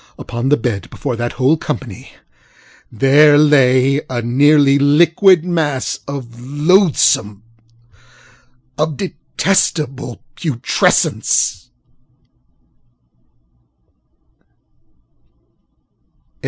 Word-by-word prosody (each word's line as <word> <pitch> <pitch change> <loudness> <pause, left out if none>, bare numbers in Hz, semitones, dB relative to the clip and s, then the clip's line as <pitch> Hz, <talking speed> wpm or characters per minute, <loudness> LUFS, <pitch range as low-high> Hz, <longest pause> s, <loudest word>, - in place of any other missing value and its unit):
Upon 120 +3 -5
the 145 - +3
bed, 110 -4 -4
before 130 -4 -5
that 120 0 -4
whole 135 +5 +1
company, 140 -9 -7 0.8
there 145 +5 +4
lay 140 -2 +3
a 120 -2 -4
nearly 140 +3 +3
liquid 165 +5 +3
mass 145 - -2
of 140 -2 -6
loathsomeŌĆöof 145 - +1 1.5
detestable 150 -9 -3
putrescence. 145 -9 -1
140 Hz, 60 wpm, -16 LUFS, 125-150 Hz, 1.5 s, there